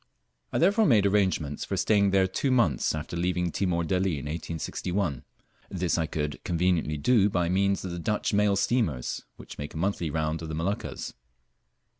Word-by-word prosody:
I - - -1
therefore 200 +5 +4
made 105 -6 +4
arrangements 95 -8 +1
for - - -3
staying 100 -2 +3
there 95 -1 +3
two 95 +9 -1
months 115 - +2
after 80 +2 -5
leaving 90 0 0
Timor 85 -2 0
Delli 90 +2 0
in 70 - -6
1861. 85 0 -3 0.5
This 90 -2 -1
I 80 -2 0
could 75 -1 -4
conveniently 85 -3 0
do 105 +5 +3
by 90 -3 0
means 100 +1 +1
of 90 - -4
the 85 - -5
Dutch 105 +6 -1
mail 105 -1 +3
steamers, 95 - 0
which - - -11
make 75 +2 -6
a - - -4
monthly 90 -1 -1
round 80 +1 -1
of 80 - -6
the 80 - -3
Moluccas. 90 +6 -3
90 Hz, 175 wpm, -27 LUFS, 80-100 Hz, 0.5 s, therefore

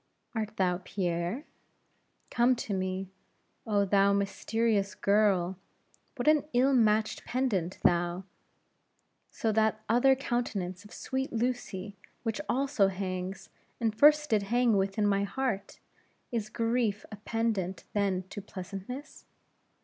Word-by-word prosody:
'Art 215 -2 -3
thou 180 -2 +1
Pierre? 180 - -2 0.9
Come 245 +1 +4
to 220 -3 -4
me' 185 0 -2 0.6
oh, 205 -2 +2
thou 200 0 +4
mysterious 200 +1 0
girl, 195 -3 +2 0.6
what 250 +1 -3
an 305 -2 +5
ill 260 +3 +4
matched 220 -3 +2
pendant 210 -9 -1
thou, 175 +1 +2 1.2
to 220 -1 +2
that 220 0 +1
other 245 +4 +5
countenance 210 -8 -2
of 210 - -15
sweet 265 0 -3
Lucy, 220 -5 -3 0.3
which 225 +4 -2
also 265 -6 +2
hangs, 185 0 -4 0.3
and 225 -3 +1
first 300 +4 +5
did 215 -2 +4
hang 235 +2 +2
within 195 +2 +1
my 200 -1 +2
heart! 215 -2 -2 0.5
Is 220 -3 -2
grief 230 -3 0
a 210 - -7
pendant 210 -4 -2
then 195 -3 +1
to 205 - -6
pleasantness? 195 +9 -8
210 Hz, 120 wpm, -30 LUFS, 195-240 Hz, 1.2 s, an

